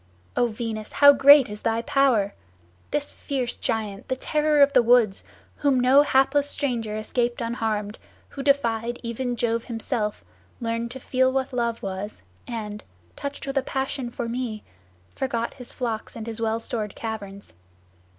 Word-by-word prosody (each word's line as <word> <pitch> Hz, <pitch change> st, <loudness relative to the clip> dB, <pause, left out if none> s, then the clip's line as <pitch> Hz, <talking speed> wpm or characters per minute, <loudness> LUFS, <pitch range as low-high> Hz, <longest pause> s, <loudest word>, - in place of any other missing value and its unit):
O 245 Hz, -, +3 dB
Venus, 215 Hz, -1 st, -5 dB
how 285 Hz, 0 st, +8 dB
great 275 Hz, 0 st, +8 dB
is 210 Hz, 0 st, -8 dB
thy 225 Hz, 0 st, 0 dB
power! 240 Hz, -7 st, +2 dB, 0.6 s
this 290 Hz, -1 st, -2 dB
fierce 255 Hz, -4 st, -3 dB
giant, 210 Hz, -3 st, -3 dB
the 260 Hz, -, 0 dB
terror 300 Hz, +2 st, +3 dB
of 280 Hz, 0 st, +3 dB
the -, -, +6 dB
woods, 235 Hz, -4 st, +4 dB, 0.3 s
whom 280 Hz, -3 st, +2 dB
no 260 Hz, +3 st, +6 dB
hapless 280 Hz, 0 st, +3 dB
stranger 235 Hz, -8 st, -2 dB
escaped 240 Hz, +2 st, -1 dB
unharmed, 220 Hz, -3 st, -2 dB, 0.3 s
who 275 Hz, -, -7 dB
defied 240 Hz, -4 st, +1 dB
even 245 Hz, +1 st, -2 dB
Jove 230 Hz, 0 st, -1 dB
himself, 225 Hz, -2 st, -3 dB, 0.3 s
learned 230 Hz, -1 st, -2 dB
to 260 Hz, +2 st, -8 dB
feel 260 Hz, 0 st, +2 dB
what 265 Hz, 0 st, -1 dB
love 235 Hz, -2 st, -1 dB
was, 195 Hz, +2 st, -5 dB, 0.2 s
and, 210 Hz, -3 st, -5 dB, 0.3 s
touched 280 Hz, 0 st, -5 dB
with 275 Hz, 0 st, 0 dB
a -, -, -1 dB
passion 265 Hz, -1 st, -3 dB
for 240 Hz, 0 st, -4 dB
me, 230 Hz, -3 st, -4 dB, 0.5 s
forgot 235 Hz, -3 st, -2 dB
his 250 Hz, -, -10 dB
flocks 230 Hz, -4 st, -4 dB
and 225 Hz, -2 st, -6 dB
his 230 Hz, 0 st, -5 dB
well 225 Hz, 0 st, 0 dB
stored 215 Hz, -3 st, -4 dB
caverns. 205 Hz, -3 st, -6 dB
235 Hz, 155 wpm, -25 LUFS, 220-265 Hz, 0.6 s, how